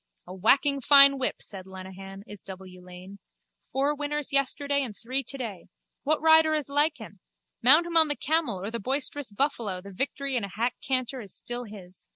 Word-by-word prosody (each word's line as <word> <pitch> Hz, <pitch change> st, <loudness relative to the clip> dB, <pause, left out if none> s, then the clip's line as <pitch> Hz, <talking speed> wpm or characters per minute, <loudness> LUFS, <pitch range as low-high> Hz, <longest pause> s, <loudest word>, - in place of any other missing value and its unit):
A 180 Hz, -, -10 dB
whacking 275 Hz, +9 st, +2 dB
fine 275 Hz, 0 st, +7 dB
whip, 260 Hz, -, -2 dB
said 190 Hz, -2 st, -9 dB
Lenehan, 190 Hz, +1 st, -10 dB
is 205 Hz, -4 st, -11 dB
W. 185 Hz, -1 st, -11 dB
Lane. 185 Hz, +2 st, -12 dB, 0.5 s
Four 275 Hz, +2 st, 0 dB
winners 295 Hz, -1 st, -4 dB
yesterday 280 Hz, +1 st, 0 dB
and 235 Hz, -7 st, -5 dB
three 255 Hz, +4 st, -3 dB
today. 230 Hz, -9 st, -5 dB, 0.3 s
What 305 Hz, +2 st, 0 dB
rider 320 Hz, -1 st, +5 dB
is 295 Hz, -3 st, -3 dB
like 295 Hz, +2 st, +2 dB
him? 205 Hz, -3 st, -12 dB, 0.4 s
Mount 300 Hz, +8 st, +7 dB
him 340 Hz, -1 st, -6 dB
on 320 Hz, -1 st, +7 dB
the 290 Hz, -, -1 dB
camel 290 Hz, -, -1 dB
or 200 Hz, +4 st, -5 dB
the 235 Hz, -, -4 dB
boisterous 270 Hz, +1 st, -2 dB
buffalo 210 Hz, -5 st, -2 dB
the 200 Hz, +2 st, -12 dB
victory 275 Hz, +5 st, -2 dB
in 240 Hz, -, 0 dB
a -, -, -3 dB
hack 230 Hz, +5 st, -2 dB
canter 255 Hz, 0 st, -2 dB
is 200 Hz, -4 st, -10 dB
still 245 Hz, 0 st, -6 dB
his. 190 Hz, -4 st, -11 dB
255 Hz, 190 wpm, -26 LUFS, 195-285 Hz, 0.5 s, fine